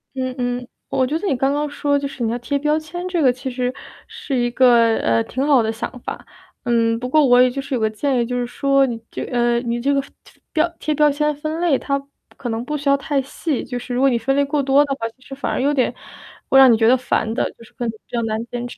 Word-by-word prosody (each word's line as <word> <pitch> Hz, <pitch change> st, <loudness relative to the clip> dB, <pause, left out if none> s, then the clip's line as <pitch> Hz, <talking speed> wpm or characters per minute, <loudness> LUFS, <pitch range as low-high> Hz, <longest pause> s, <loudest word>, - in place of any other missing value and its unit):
嗯 255 Hz, -1 st, -2 dB
嗯， 245 Hz, 0 st, -2 dB, 0.2 s
我 260 Hz, -, +1 dB
觉 300 Hz, +5 st, -1 dB
得 395 Hz, -, -4 dB
你 270 Hz, -, +1 dB
刚 270 Hz, +2 st, +1 dB
刚 295 Hz, 0 st, -1 dB
说 285 Hz, 0 st, 0 dB
就 280 Hz, -, -3 dB
是 260 Hz, -3 st, -6 dB
你 225 Hz, -, 0 dB
要 240 Hz, -, -1 dB
贴 280 Hz, +4 st, -1 dB
标 300 Hz, +2 st, +1 dB
签， 350 Hz, +4 st, -6 dB
这 350 Hz, -3 st, -1 dB
个 255 Hz, -3 st, +5 dB
其 260 Hz, +2 st, -6 dB
实 250 Hz, 0 st, -2 dB, 0.3 s
是 275 Hz, -, -5 dB
一 240 Hz, -1 st, +1 dB
个， 235 Hz, -3 st, +5 dB
呃， 115 Hz, 0 st, +1 dB
挺 265 Hz, +2 st, -3 dB
好 275 Hz, -5 st, +5 dB
的 220 Hz, 0 st, 0 dB
想 235 Hz, +3 st, -6 dB
法。 -, -, -7 dB, 0.4 s
嗯， 230 Hz, -2 st, +2 dB
不 250 Hz, -, -4 dB
过 300 Hz, +2 st, +4 dB
我 245 Hz, 0 st, +6 dB
也 255 Hz, -, +5 dB
就 275 Hz, +2 st, -4 dB
是 270 Hz, -1 st, -3 dB
有 -, -, -1 dB
个 220 Hz, -, +2 dB
建 255 Hz, +4 st, -1 dB
议， 235 Hz, -, +1 dB
就 250 Hz, +1 st, -3 dB
是 245 Hz, -, -1 dB
说 275 Hz, +2 st, +2 dB
你 235 Hz, -3 st, -4 dB
这 -, -, -4 dB
呃， 240 Hz, -1 st, +1 dB
你 240 Hz, -1 st, -2 dB
这 280 Hz, +2 st, +1 dB
个 275 Hz, -, +2 dB
分 -, -, -16 dB, 0.4 s
标 320 Hz, +1 st, +2 dB
贴 305 Hz, -, -1 dB
标 300 Hz, 0 st, +4 dB
签 300 Hz, +1 st, 0 dB
分 310 Hz, +3 st, -4 dB
类 320 Hz, -7 st, +3 dB
它 275 Hz, -1 st, -2 dB, 0.3 s
可 245 Hz, -, -5 dB
能 225 Hz, +1 st, -2 dB
不 300 Hz, -, -3 dB
需 285 Hz, -1 st, -1 dB
要 280 Hz, -, +5 dB
太 280 Hz, -1 st, -1 dB
细， 280 Hz, +1 st, -3 dB
就 245 Hz, -, -5 dB
是 245 Hz, 0 st, -6 dB
如 250 Hz, -, 0 dB
果 275 Hz, -, +5 dB
你 240 Hz, -, +1 dB
分 270 Hz, +4 st, 0 dB
类 285 Hz, -, +3 dB
过 285 Hz, +1 st, 0 dB
多 275 Hz, +2 st, +4 dB
的 280 Hz, -1 st, -2 dB
话， 230 Hz, -3 st, -3 dB
其 260 Hz, -, -35 dB
实 270 Hz, -, -9 dB
反 280 Hz, -, -3 dB
而 -, -, -1 dB
有 285 Hz, +2 st, +2 dB
点， 260 Hz, -3 st, +1 dB, 0.6 s
会 270 Hz, -, +5 dB
让 260 Hz, -2 st, +8 dB
你 -, -, +5 dB
觉 225 Hz, 0 st, +3 dB
得 255 Hz, +2 st, +5 dB
烦 225 Hz, -3 st, -1 dB
的 -, -, 0 dB
就 230 Hz, -, -17 dB
是 -, -, -17 dB
可 245 Hz, -, -4 dB
能 -, -, -1 dB
比 220 Hz, -, -16 dB
较 235 Hz, -1 st, -1 dB
难 220 Hz, 0 st, -2 dB
坚 245 Hz, 0 st, -5 dB
持。 -, -, -11 dB
260 Hz, 310 characters per minute, -20 LUFS, 240-285 Hz, 0.6 s, 让